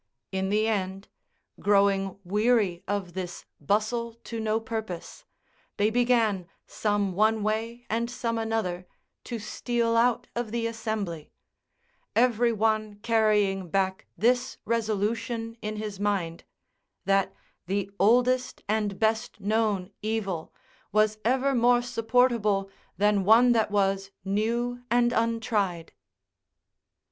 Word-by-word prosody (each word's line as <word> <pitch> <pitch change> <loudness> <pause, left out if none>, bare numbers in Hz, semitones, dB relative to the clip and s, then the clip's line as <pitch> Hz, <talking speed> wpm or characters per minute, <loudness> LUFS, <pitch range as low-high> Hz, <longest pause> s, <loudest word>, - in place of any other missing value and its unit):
In 190 0 -1
the 215 +2 +2
end, 195 -2 -2 0.5
growing 195 -1 +2
weary 205 -2 +1
of 195 -3 -2
this 180 -1 -6
bustle 220 +7 0
to 230 - -5
no 220 0 0
purpose, 220 -6 -6 0.5
they 210 +2 +2
began, 230 -6 +2 0.2
some 205 -3 -1
one 215 +2 +2
way 225 +3 -2
and 230 +2 -1
some 230 -2 -2
another, 210 -6 -2 0.4
to 240 - -4
steal 230 +2 -1
out 240 0 +3
of 240 -2 -2
the 230 +1 -2
assembly: 220 -8 -4 0.8
every 240 0 +3
one 215 -1 0
carrying 210 -5 +2
back 190 +1 -1
this 245 +3 +1
resolution 225 +1 -1
in 215 0 -4
his 210 -2 -5
mind, 195 -5 -1 0.6
that 195 -1 +2 0.4
the 200 +1 -1
oldest 250 +5 +3
and 210 -2 0
best 220 +2 0
known 210 -2 0
evil 200 -6 -2 0.4
was 215 0 +2
ever 265 +4 +2
more 240 0 +4
supportable 230 -4 +1 0.3
than 205 -1 +3
one 230 +5 +6
that 225 -3 +2
was, 195 -1 +1 0.2
new 235 +5 -1
and 240 0 +3
untried. 220 -7 -1
215 Hz, 115 wpm, -27 LUFS, 195-230 Hz, 0.8 s, one